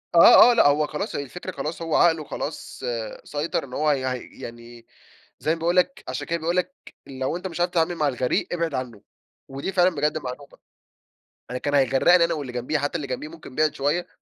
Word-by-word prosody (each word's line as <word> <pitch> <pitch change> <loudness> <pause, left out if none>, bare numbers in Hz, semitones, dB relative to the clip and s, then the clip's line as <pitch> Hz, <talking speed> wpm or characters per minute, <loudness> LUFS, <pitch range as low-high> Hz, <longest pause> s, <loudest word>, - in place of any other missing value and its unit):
آه، 240 +7 +9
آه - - +3
لأ، 235 - +5
هو 150 +1 +3
خلاص 150 - -4
هي 140 - -2
الفكرة 180 +7 -7
خلاص، 165 -1 -5
هو 165 -1 -1
عقله 160 -2 +4
خلاص - - -6 0.4
سيطر 150 +1 -2
إن 125 - -11
هو 150 +3 +2
يع 130 -2 -1
يعني، 120 -1 -11 0.5
زي 160 +2 0
ما - - -11
باقول 170 +2 +3
لك؛ 275 - -19
عشان - - -4
كده 170 0 -1
بيقول 165 +2 -1
لك: 180 0 -1 0.3
"لو 130 +4 -3
أنت 180 +2 -5
مش 170 -2 -7
عارف 175 0 +1
تتعامل 170 0 +1
مع 150 -2 +1
الغريق، 125 -2 0
ابعد 170 -3 -1
عنه"، 125 -5 -5 0.5
ودي 135 +7 -5
فعلًا 180 -1 +4
بجد 150 +2 0
معلومة 135 0 -8 0.9
أنا 125 - -2
كان 145 - -2
هيغرّقني 145 +6 +5
أنا 170 - -1
واللي 140 -6 -5
جمبيه، 125 +5 -1
حتى 145 +4 -2
اللي 150 -4 -3
جمبيه 130 +4 -4
ممكن 155 -5 -12
بِعِد 155 -1 +2
شوية، 145 +6 0
150 Hz, 205 wpm, -24 LUFS, 135-170 Hz, 0.9 s, آه